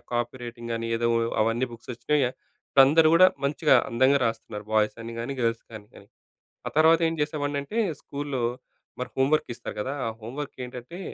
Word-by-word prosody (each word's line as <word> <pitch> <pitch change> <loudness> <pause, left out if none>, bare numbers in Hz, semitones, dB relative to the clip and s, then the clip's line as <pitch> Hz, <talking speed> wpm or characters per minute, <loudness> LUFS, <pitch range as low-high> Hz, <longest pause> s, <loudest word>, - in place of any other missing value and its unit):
Copy 120 +1 -1
writing 120 0 -8
గానీ, 115 0 -3
ఏదో 115 0 +1 0.3
అవన్నీ 115 +3 0
బుక్స్ 115 +2 -10
వొచ్చినాయి. 130 +2 +1 0.6
అందరూ 155 +2 +5
కూడా 185 +2 +8 0.2
మంచిగా 145 0 +3
అందంగా 130 +4 +3
రాస్తున్నారు. 110 -2 -5
బాయ్స్ 105 -1 +3
అని 115 0 -7
కాని, 120 +4 -3
గర్ల్స్ 115 -1 0
కాని, 105 -2 -9
కాని. - - -15 0.6
ఆ - - -1
తర్వాత 160 +1 +6
ఏం - - -3
చేసేవాడిని 145 -1 -1
అంటే, 210 +11 -6 0.2
స్కూల్‌లో 140 -3 -4 0.6
మరి 125 - -4
హోమ్ 135 +1 +3
వర్క్ 155 -5 +1
ఇస్తారు - - -7
కదా! 135 +6 -3
ఆ - - 0
హోమ్ 115 +4 -8
వర్క్ 145 - -7
ఏంటంటే, 125 +8 -9
125 Hz, 180 wpm, -26 LUFS, 115-145 Hz, 0.6 s, కూడా